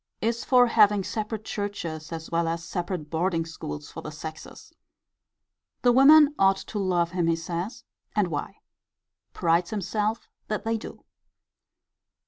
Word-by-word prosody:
Is 230 +1 -1
for 250 -2 +5
having 210 -4 +4
separate 215 +1 -4
churches 170 -7 -5
as 160 -1 -6
well 170 0 +1
as 165 0 -2
separate 175 -3 -4
boarding 165 0 0
schools 75 - -7
for - - -7
the - - -7
sexes. 155 +1 -9 1.1
The 245 - +6
women 290 +4 +7
ought 195 0 +5
to 205 - -6
love 175 -3 +1
him, 175 -2 0
he 165 - +3
says: 170 +6 -5 0.3
and - - +2
why. - - -5 0.7
Prides 170 0 +1
himself 215 +2 -2 0.2
that 215 - -2
they 225 0 0
do. - - -10
185 Hz, 140 wpm, -26 LUFS, 165-215 Hz, 1.1 s, women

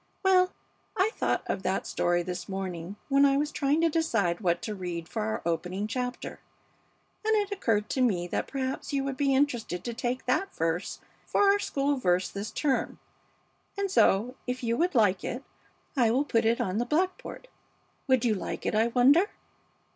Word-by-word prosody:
Well, 370 -1 +4 0.5
I 390 +4 +3
thought - - 0
of - - -2
that - - -1
story 175 0 +1
this 180 0 -5
morning 190 -1 -4
when 275 0 +4
I 275 -1 +5
was 295 +1 0
trying 290 +3 +1
to 335 - +4
decide 225 - 0
what 175 -3 +1
to 215 - -3
read 175 -4 -5
for - - -4
our 110 +1 -2
opening 180 +4 -1
chapter, 250 +3 -4 0.8
and 440 0 +2
it 410 -1 0
occurred 225 - 0
to 260 - 0
me 195 -9 +2
that - - -2
perhaps 265 +1 -3
you 275 -1 +1
would 275 -1 -3
be 275 0 +2
interested 240 -10 0
to 240 - -4
take 250 +2 -3
that 375 +10 0
verse 165 +3 -2 0.3
for - - +2
our 405 - +2
school 280 -5 0
verse 180 -6 +1
this 200 +2 -5
term, 280 -3 -1 0.8
and 400 -1 -1
so 235 - +3
if 250 +1 -3
you 230 0 +1
would 345 +3 0
like 205 -5 +3
it 250 +3 -4 0.5
I 240 -5 +4
will 260 +6 +2
put 230 -5 +1
it 230 +1 +2
on 190 +3 -1
the 240 - 0
blackboard. 370 - -2 0.6
Would 260 -3 +3
you 225 - +3
like 195 - -5
it, - - 0
I 220 +2 +3
wonder?" 275 - +4
245 Hz, 185 wpm, -28 LUFS, 195-285 Hz, 0.8 s, I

